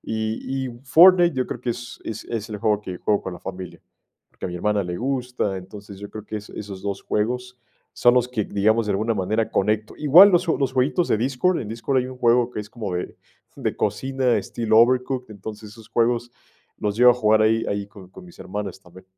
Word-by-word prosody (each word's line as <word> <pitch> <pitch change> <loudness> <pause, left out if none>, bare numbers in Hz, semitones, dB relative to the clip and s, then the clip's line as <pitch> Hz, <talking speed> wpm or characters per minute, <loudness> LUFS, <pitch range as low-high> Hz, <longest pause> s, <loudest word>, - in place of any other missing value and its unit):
Y 110 +4 -3
y - - -5
Fortnite 175 +2 +6
yo 130 - +1
creo 120 - -6
que 125 - -2
es 120 +2 -7
es 110 -1 -6
es 115 -1 -4
el 105 - -5
juego 105 0 +1
que 90 -3 -7
juego 105 -1 +1
con 95 - -6
la 90 - -10
familia, 90 -3 -8 0.5
porque, - - -11
a - - -5
mi 90 - -6
hermana 105 +2 0
le 90 0 -4
gusta. 125 -6 -2
Entonces, 100 +1 -10
yo 100 0 -8
creo 110 -1 -8
que 110 - -5
es 105 0 -9
esos 100 -2 -8
2 100 -1 -4
juegos 125 +3 -2 0.4
son 120 0 +4
los 125 0 +2
que, 110 -5 -2
digamos, 110 +2 +1
de - - 0
alguna 110 +4 0
manera 105 +3 -1
conecto 105 0 0
igual 170 +8 +8
los 175 0 +2
ju 165 - +1
los 135 -2 -1
jueguitos 135 +7 +1
de - - +3
Discord, 135 +10 0
en 110 - -6
Discord 120 +4 -1
hay 125 - -1
un 130 0 -9
juego 120 0 +3
que 105 - -5
es 105 +1 -10
como 105 -7 -5
de 90 - -4 0.4
de - - -3
cocina, 130 +4 0
estilo 110 -1 +1
Overcooked, 125 0 +2
entonces, 105 +1 -9
esos 110 0 -15
juegos 120 +1 0 0.5
los 105 0 -2
llego 125 +1 +7
a - - +3
jugar 110 -2 +3
ahí 115 +1 +2
ahí 100 0 -3
con 95 -3 -14
con 180 - -13
mis 175 - -16
hermanas 100 -1 -6
también. 95 0 -16
110 Hz, 225 wpm, -23 LUFS, 105-125 Hz, 0.5 s, igual